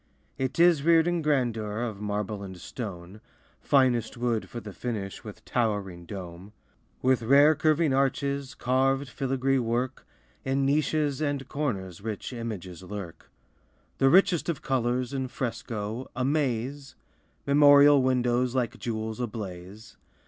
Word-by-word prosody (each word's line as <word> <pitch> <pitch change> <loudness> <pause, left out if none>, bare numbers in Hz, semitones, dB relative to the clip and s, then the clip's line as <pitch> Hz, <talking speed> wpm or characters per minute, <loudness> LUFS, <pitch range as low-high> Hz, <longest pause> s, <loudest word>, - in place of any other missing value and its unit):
It 130 +4 -2
is 170 -4 +5
reared 165 +2 +4
in 175 -1 0
grandeur 120 -7 0
Of 110 -4 -5
marble 105 0 -3
and 95 -2 -8
stone, 95 -2 -8 0.4
Finest 125 -5 +2
wood 120 -2 -1
for 120 - -6
the 105 -3 -9
finish, 105 -6 -5
With - - -11
towering 100 -7 -2
dome. 95 +1 -8 0.5
With 130 -1 +3
rare 140 +6 +6
curving 155 -1 +2
arches, 140 0 0
Carved 135 +2 +1
filigree 135 0 0
work, 120 +2 -2 0.4
In 135 +1 0
niches 150 0 +1
and 145 -3 -2
corners 100 - -3
Rich 110 +3 -5
images 100 -8 -6
lurk. 90 -4 -8 0.7
The 135 - +5
richest 175 0 +4
of 165 - -3
colors 125 0 0
In 130 -1 -2
fresco, 115 -2 -4
amaze! 135 0 -1 0.5
Memorial 145 0 +7
windows 125 -1 +1
Like 125 -3 -1
jewels 110 -1 -4
ablaze. 105 -3 -7
125 Hz, 125 wpm, -27 LUFS, 105-140 Hz, 0.7 s, Memorial